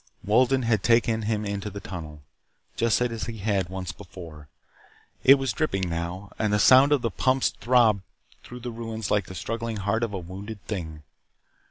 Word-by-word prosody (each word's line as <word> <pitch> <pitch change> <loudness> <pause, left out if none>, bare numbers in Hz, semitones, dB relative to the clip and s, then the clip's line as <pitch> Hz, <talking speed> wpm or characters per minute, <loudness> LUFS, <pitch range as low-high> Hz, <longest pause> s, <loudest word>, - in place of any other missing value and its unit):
Wolden 130 +5 +3
had 115 -4 +2
taken 115 0 +3
him 105 0 -1
into 100 0 -3
the 100 0 -7
tunnel, 80 -6 -8 0.5
just 115 -1 +2
as 115 -3 -1
he 115 -1 -6
had 100 -3 -1
once 95 -1 -5
before. 85 -6 -11 0.8
It 135 - +9
was 135 -4 -2
dripping 95 - -1
now, 85 +4 -4
and 110 -1 +1
the 105 - +3
sound 130 +6 +6
of 145 -4 +3
the 115 - 0
pumps 130 +7 +2
throbbed 115 -5 +3 0.4
through 125 0 -10
the 120 0 -5
ruins 115 -2 -5
like 105 -3 +1
the 95 - -9
struggling 115 +5 -4
heart 105 +3 0
of 115 -2 -1
a - - -1
wounded 100 +4 -8
thing. 80 -7 -5
105 Hz, 180 wpm, -26 LUFS, 95-115 Hz, 0.8 s, It